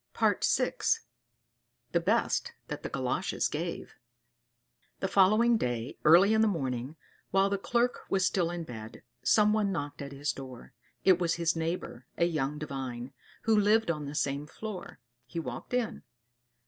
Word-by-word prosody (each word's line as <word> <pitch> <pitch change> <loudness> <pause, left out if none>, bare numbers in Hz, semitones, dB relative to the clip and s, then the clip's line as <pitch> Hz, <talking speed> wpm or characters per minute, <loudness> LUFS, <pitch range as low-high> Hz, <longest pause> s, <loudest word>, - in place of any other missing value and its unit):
VI. - - +4 1.5
The - - +3
Best - - +1 0.2
That - - -4
the - - -5
Galoshes - - -1
Gave - - -4 1.1
The 190 - 0
following 215 +5 +5
day, 120 0 -3
early 180 +7 +7
in 220 - +4
the 220 - +5
morning, 135 - -2 0.3
while 195 +1 +3
the 200 - 0
Clerk 240 +4 +1
was 190 -1 +2
still 180 -3 +1
in 175 -1 -4
bed, 110 -6 -9 0.2
someone 210 -1 +3
knocked 145 -6 -4
at 140 0 -6
his 140 +1 -2
door. 130 -2 -10 0.3
It 185 -2 +5
was 170 -2 +1
his 170 0 +1
neighbor, 165 -6 -4
a 170 - +3
young 150 -4 -1
Divine, 135 -3 -5 0.3
who 225 -1 +3
lived 210 -1 +4
on 150 -3 -4
the 140 +1 -6
same 140 0 -1
floor. 210 +2 -7 0.3
He 165 - -4
walked 125 -6 -6
in. 245 -3 -1
170 Hz, 150 wpm, -30 LUFS, 140-200 Hz, 1.5 s, early